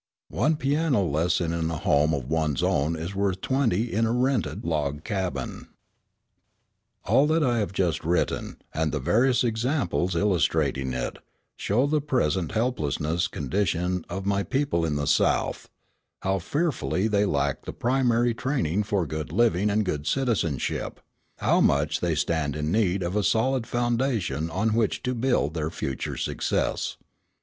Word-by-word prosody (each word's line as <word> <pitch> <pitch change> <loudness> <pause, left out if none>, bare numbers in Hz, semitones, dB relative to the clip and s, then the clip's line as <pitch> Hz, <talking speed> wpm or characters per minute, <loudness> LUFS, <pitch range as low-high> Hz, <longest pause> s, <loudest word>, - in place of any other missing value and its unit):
One 150 +10 +2
piano 145 -5 +1
lesson 85 +1 0
in 80 -1 -1
a 80 - -3
home 75 +1 +2
of 65 -3 -5
one's 80 -2 0
own 75 +4 +1
is 85 +4 -5
worth 100 -2 0
twenty 120 -3 0
in 115 +2 +2
a - - 0
rented 120 - 0
log 75 -2 -1
cabin. 95 -4 -3 1.4
All 145 - +4
that 160 +1 +2
I 120 -4 +2
have 105 - -1
just 90 -5 0
written, 85 +2 -1 0.2
and 80 -1 0
the - - -1
various 120 - +3
examples 115 - 0
illustrating 75 -8 +1
it, 60 -1 -3 0.4
show 120 +7 +1
the 150 +1 +1
present 95 - 0
helpless 110 - 0 0.3
condition 90 +3 -1
of 95 +2 -4
my 100 0 +1
people 135 - 0
in 75 -2 -1
the 70 0 -1
South, 70 - +1 0.5
how 95 0 +1
fearfully 135 - -1
they 105 -2 +2
lack 70 -8 -1
the - - -4
primary 120 -1 +1
training 115 - 0
for 100 -4 0
good 75 0 -5
living 105 0 +2
and 105 +1 +1
good 75 -5 -3
citizenship, 110 - -1 0.4
how - - +2
much 70 +2 +2
they 85 -2 0
stand 80 -2 0
in 75 +1 -2
need 95 -3 +1
of 85 +3 -2
a 105 - +2
solid 115 +4 +1
foundation 120 - 0
on 100 +6 0
which 110 -2 0
to 125 - -1
build 120 - +1
their 80 -2 -2
future 70 -5 -4
success. - - -1
95 Hz, 155 wpm, -26 LUFS, 80-120 Hz, 1.4 s, All